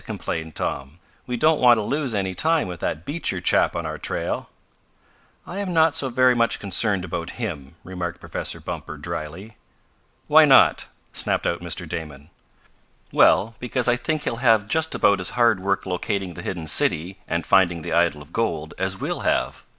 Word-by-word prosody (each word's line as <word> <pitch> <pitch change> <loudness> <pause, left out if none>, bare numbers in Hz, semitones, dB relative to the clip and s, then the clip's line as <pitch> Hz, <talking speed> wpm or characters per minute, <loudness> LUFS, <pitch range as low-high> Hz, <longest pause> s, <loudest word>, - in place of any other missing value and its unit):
complained 80 -1 -5
Tom. 70 +4 -4 0.3
"We 125 -1 -2
don't 155 +5 +3
want 120 -2 +6
to 110 - -1
lose 135 -1 -1
any 95 -2 -1
time 160 - +1
with 90 -2 -7
that 80 - -3
Beecher 145 - -2
chap - - +2
on - - -3
our - - -5
trail." - - -3 1.0
"I 190 - -6
am 190 -4 -3
not 160 -1 +4
so 135 - -1
very 130 +1 +4
much 115 -1 +1
concerned 100 -1 +1
about 85 -1 -5
him," 80 - -5
remarked 85 -2 -5
Professor - - -4
Bumper, - - -7
dryly. 90 +9 -7 0.7
"Why - - +7
not?" - - +5 0.3
snapped - - -1
out 85 - -1
Mr. 85 -2 -4
Damon. 75 -1 -7 0.8
"Well, 115 +3 +4
because 125 0 -1
I 120 - +4
think 155 +5 -2
he'll 115 - -2
have 115 -4 +3
just 160 +7 +1
about 100 -1 +3
as 90 - -1
hard 115 -5 +4
work 100 +1 -1
locating 95 0 -3
the 85 - -8
hidden 85 -2 -5
city, 85 +5 +2
and 85 -1 -2
finding 85 -4 +3
the - - -4
idol 85 -4 +1
of 70 - -22
gold, 80 -9 -2
as 95 0 -1
we'll - - -3
have. - - -1
95 Hz, 180 wpm, -23 LUFS, 85-120 Hz, 1.0 s, Why